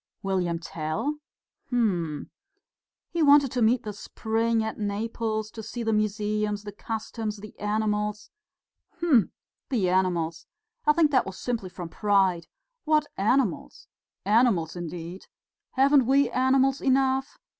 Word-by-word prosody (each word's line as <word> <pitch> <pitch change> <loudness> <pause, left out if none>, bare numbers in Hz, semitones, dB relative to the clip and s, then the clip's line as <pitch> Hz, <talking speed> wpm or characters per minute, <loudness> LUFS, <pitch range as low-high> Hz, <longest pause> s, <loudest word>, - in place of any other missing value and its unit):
"William 185 -3 0
Tell? 165 - -3 0.5
Hm!" 180 - -1 0.8
"He 340 - -1
wanted 285 -3 +6
to 250 - -1
meet 230 +2 +3
the 210 -1 -5
spring 225 +2 -1
at 220 0 -4
Naples, 215 +1 -2
to 225 - -8
see 235 +2 -6
the 225 -1 +1
museums, 210 0 -1
the 205 - -7
customs, 220 0 -5
the 210 +1 -11
animals...." 210 0 -1 0.7
"Hm! 305 - +3 0.4
The 215 -10 +1
animals! 175 -3 0 0.4
I 300 - +7
think 305 -2 +3
it 255 - +4
was 190 - -7
simply 230 -6 -3
from 175 -1 -7
pride. 190 -4 +1 0.4
What 305 -1 +2
animals? 210 - 0 0.4
Animals, 205 -7 +3
indeed! 175 +1 -7 0.5
Haven't 270 -1 +4
we 275 0 +3
animals 265 +1 +2
enough? 265 +1 +1
215 Hz, 125 wpm, -26 LUFS, 195-255 Hz, 0.8 s, I